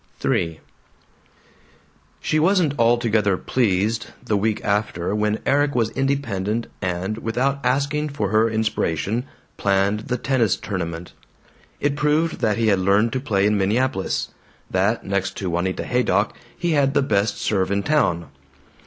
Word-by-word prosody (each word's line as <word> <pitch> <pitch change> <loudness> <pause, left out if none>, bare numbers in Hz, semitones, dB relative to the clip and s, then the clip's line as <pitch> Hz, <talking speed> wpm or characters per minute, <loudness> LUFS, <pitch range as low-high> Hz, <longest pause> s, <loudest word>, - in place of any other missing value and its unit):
III 80 -2 0 1.6
She 155 - +1
wasn't 170 -3 +3
altogether 115 -4 +3
pleased, 105 -2 0 0.2
the 105 - +1
week 105 +1 0
after, 100 -3 0
when 105 0 +1
Erik 145 0 +2
was 115 -2 +1
independent 120 -6 -1 0.2
and, 95 +4 -2
without 125 +5 0
asking 140 +4 0
for 110 -9 -2
her 110 +2 +3
inspiration, 110 - -1 0.3
planned 100 +2 +1
the 125 - -1
tennis 120 -5 +1
tournament. 85 -3 -5 0.7
It 145 0 0
proved 150 +3 +1
that 110 -4 +1
he 115 -1 +2
had 100 -2 +3
learned 100 +5 +2
to 130 - 0
play 100 -7 +1
in 105 0 +2
Minneapolis; 105 +1 0 0.4
that, 100 +5 +1
next 100 0 -2
to 95 -3 -3
Juanita 90 +2 -1
Haydock, 125 0 +1 0.2
he 175 - -1
had 140 -2 +2
the - - +4
best 100 -4 +1
serve 95 -3 0
in 100 0 0
town. 90 - +1
110 Hz, 140 wpm, -22 LUFS, 100-130 Hz, 1.6 s, the